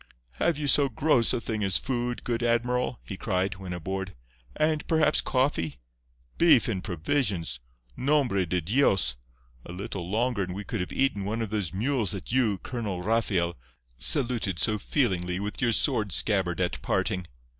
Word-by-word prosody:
"Have 170 - +2
you 150 - -3
so 140 0 +5
gross 125 -1 +2
a - - 0
thing 110 -2 -3
as 95 -2 +3
food, 120 -2 -2
good 120 -1 -2
admiral?" 120 +1 0
he 100 - -4
cried, 95 -1 -1
when 95 -2 -7
aboard. 95 +2 -4 0.4
"And, 155 0 0
perhaps, 160 -2 +3
coffee? 125 - 0 0.6
Beef 170 -8 +6
and 95 -5 -2
provisions! 90 - -1 0.4
Nombre 130 - +1
de 90 +2 0
Dios! 100 - +2 0.5
a - - -9
little 95 -1 -5
longer 115 +1 0
and 90 -1 -3
we 100 - -5
could - - -4
have 90 - -3
eaten 130 -7 0
one 110 +3 -2
of 105 - -6
those 105 -6 -1
mules 115 0 0
that 95 - -6
you, 115 -6 +2
Colonel 100 -4 -4
Rafael, 95 -5 +1 0.4
saluted 115 - +1
so 105 +4 +3
feelingly 95 -9 0
with 105 +4 -4
your 120 -2 +3
sword 105 -2 +1
scabbard 95 -5 +1
at 80 -9 -1
parting. 90 -2 -1
105 Hz, 165 wpm, -27 LUFS, 95-125 Hz, 0.6 s, Beef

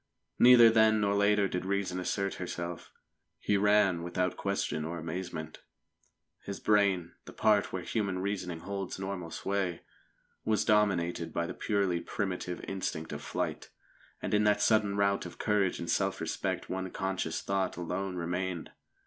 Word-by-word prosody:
Neither 120 -2 +9
then 110 -1 +5
nor 100 -1 +2
later 100 0 +3
did 90 -1 -3
Reason 95 -1 -1
assert 100 +2 -1
herself. 90 -1 -5 0.5
He 105 - 0
ran 100 -3 +4
without 90 +1 -1
question 100 -6 -2
or 85 +2 -4
amazement. 80 -1 -5 0.8
His 100 -1 -6
brain 100 -5 +2
the - - -10
part 105 -2 +3
where 90 -1 -4
human 100 -5 -1
reasoning 90 -3 -3
holds 100 0 -4
normal 95 -3 -4
sway 95 -1 -2 0.6
was 110 -1 +1
dominated 90 -6 +2
by 85 - -1
the - - -5
purely 100 -5 0
primitive 90 -3 -3
instinct 80 -5 -4
of 75 - -5
flight. - - -3 0.5
And - - -2
in 105 0 +4
that 105 0 +3
sudden 105 -2 +3
rout 100 0 +1
of - - -12
courage 105 -3 +1
and 85 - -5
self - - 0
respect - - -2
one 95 0 -3
conscious 95 -4 -2
thought 95 -2 -1
alone 95 +2 -3
remained. 90 0 -3
95 Hz, 150 wpm, -31 LUFS, 90-100 Hz, 0.8 s, Neither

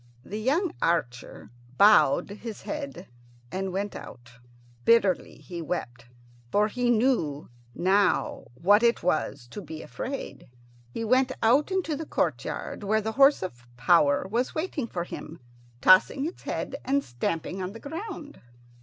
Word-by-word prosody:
The 210 - -5
young 310 - +1
archer 125 -9 -2 0.3
bowed 205 -1 +5
his 215 +1 -8
head 285 -2 -6 0.4
and 190 +1 -3
went 200 +2 -3
out. 120 0 -10 0.5
Bitterly 205 - +3
he 175 -2 -8
wept, 125 -8 -5 0.4
for 210 +1 +3
he 245 +2 -1
knew 220 - +1 0.3
now 195 +3 +1
what 205 - +4
it 235 -5 +2
was 140 -6 -1
to 205 - -7
be 160 -4 -8
afraid. 150 - -6 0.4
He 225 - -5
went 255 +3 +3
out 260 +9 +4
into 375 -5 -1
the 310 +1 -6
courtyard, - - -2
where 215 +2 +2
the 220 +1 -2
horse 275 0 +5
of 125 -9 -7
power 145 +3 +3
was 235 +6 -1
waiting 315 -6 -2
for 175 -6 -3
him, 165 -1 -9 0.4
tossing 190 +9 +5
its 335 - -6
head - - -4
and 280 +1 +1
stamping 165 +9 -3
on 185 +2 -4
the 230 - -9
ground. 320 - -7
205 Hz, 145 wpm, -27 LUFS, 170-265 Hz, 0.5 s, bowed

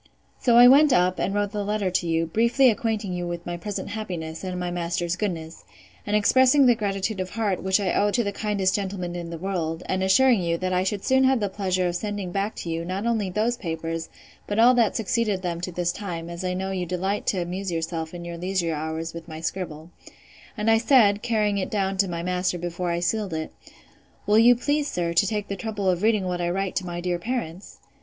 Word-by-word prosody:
So 240 -2 +4
I 245 +1 +10
went 285 +3 +7
up, 180 -2 +2
and - - 0
wrote 205 0 -1
the 210 -1 -2
letter 205 -2 -1
to 175 -1 0
you, 165 0 +1
briefly 235 +8 +3
acquainting 215 -3 -2
you 175 0 -3
with 175 0 -5
my 175 - -3
present 205 +3 -5
happiness, 175 -7 -5
and 185 -1 -4
my 180 0 -3
master's 175 0 -2
goodness, 170 -5 -4 0.4
and 205 - +1
expressing 260 +6 +5
the 245 - +6
gratitude 200 -1 -2
of 185 0 -3
heart, 205 -3 -1
which 190 +1 +2
I 190 -3 0
owe 205 - +2
to 235 +3 +1
the 200 - -2
kindest 200 -2 0
gentleman 190 -3 -3
in 170 -1 -5
the 165 - -6
world, 170 -2 -3
and 185 0 -1
assuring 230 +4 +4
you, 170 -1 0
that 185 +1 -2
I 180 0 +2
should 195 +1 -2
soon 265 0 +4
have 260 -1 +3
the 205 -2 -1
pleasure 185 -2 -1
of 175 - -2
sending 205 -2 -4
back 200 +3 -2
to 170 - -6
you, 165 0 -2
not 185 +5 -3
only 220 -5 0
those 220 +6 0
papers, 165 -3 -4 0.4
but 205 - -2
all 240 +3 +7
that 235 -4 +2
succeeded 225 -4 0
them 170 -1 -3
to 180 - -4
this 175 0 -1
time, 170 -5 -6
as 170 +1 -6
I 180 0 -1
know 190 +1 -3
you 180 -2 -3
delight 190 +4 -2
to 190 - +1
amuse 185 +2 -4
yourself 165 -1 -3
in 175 -1 -8
your 170 0 -6
leisure 180 -2 -1
hours 160 +2 -4
with 170 -1 -9
my 155 0 -7
scribble: 165 -1 -5 0.7
And 215 +1 +2
I 225 - +5
said, 225 -5 +4
carrying 215 -4 +1
it 185 - -3
down 195 -2 -1
to 195 0 +2
my 170 -1 -4
master, 180 0 -1
before 175 +1 -3
I 170 0 -1
sealed 195 -1 -1
it, 160 0 -5 0.7
Will 210 +1 +4
you 240 +2 +7
please, 290 +4 0
sir, 170 -1 -2
to 170 +4 +3
take 210 0 -2
the 200 - -3
trouble 205 -1 -3
of 180 -1 +1
reading 215 -2 +2
what 180 -1 -2
I 175 - 0
write 195 +1 -2
to 185 - -2
my 175 0 -4
dear 175 -1 -1
parents? 200 -5 -5
190 Hz, 235 wpm, -24 LUFS, 175-210 Hz, 0.7 s, I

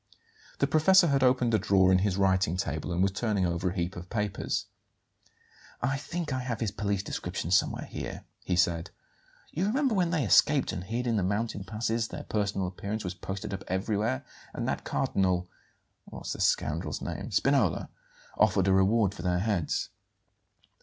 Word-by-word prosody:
The - - +2
professor 165 +5 +5
had 140 -1 +2
opened 125 -2 +3
a 110 - +4
drawer 95 -1 +4
in 95 - +5
his 95 -1 0
writing 95 -3 +2
table 80 -2 -3
and 85 +2 +1
was 95 - +2
turning 100 -2 0
over 85 +1 0
a 90 - -6
heap 85 0 -2
of 90 +1 -8
papers. 105 -4 -2 1.1
"I 135 +3 0
think 160 +1 -4
I 130 - -1
have 125 -3 -3
his 110 -4 -1
police 100 -1 -1
description 90 -3 -4
somewhere 95 - +2
here," - - -6 0.2
he 90 - 0
said. 85 -1 +1 0.6
"You 180 +5 -1
remember 265 +3 +1
when 180 -4 +2
they 165 -4 +1
escaped 100 - +4
and 90 - -4
hid 115 +6 -3
in 115 -2 +1
the 100 - +1
mountain 105 +1 -1
passes 115 +2 -1
their - - -7
personal 100 -3 -1
appearance 100 +4 -4
was 90 -1 -3
posted 95 +1 -6
up 95 - -5
everywhere, 95 - -1 0.3
and - - -2
that - - -2
Cardinal 90 -2 0 0.6
what's - - -6
the - - -6
scoundrel's 80 +2 0
name? - - -5
Spinola, - - +2 0.5
offered 95 0 +3
a 95 - +4
reward 100 +1 +3
for 85 - -8
their 90 0 +1
heads." 95 -5 -1
100 Hz, 175 wpm, -29 LUFS, 90-115 Hz, 1.1 s, professor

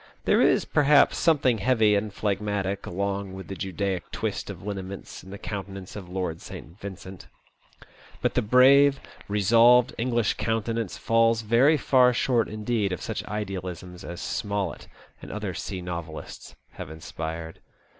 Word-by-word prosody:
There - - +4
is, - - +3
perhaps, 145 0 +4
something 140 -8 +3
heavy 110 -1 +3
and 105 +1 0
phlegmatic 100 -1 -2
along 100 +1 -3
with 95 0 -9
the 95 - -5
Judaic 95 0 -3
twist - - -3
of - - -8
lineaments 100 -2 -6
in 95 - -13
the 100 - -7
countenance 95 -2 -7
of 95 -4 -8
Lord 90 -3 -3
St. 85 +6 -10
Vincent; 95 -2 -9 0.9
but - - 0
the - - +2
brave, 135 +5 +6 0.3
resolved 115 +4 +5
English 120 -2 +1
countenance 115 -2 -2
falls 115 0 +2
very 125 +8 +4
far 125 -2 +4
short 120 -2 +1
indeed 110 -1 -1
of 90 - -3
such - - -4
idealisms 90 -4 -5
as 85 0 -7
Smollett 100 - -3 0.3
and - - -9
other 105 -3 -4
sea 90 +2 -5
novelists 85 -3 -7 0.2
have - - -8
inspired. 80 0 -6
100 Hz, 145 wpm, -26 LUFS, 95-115 Hz, 0.9 s, brave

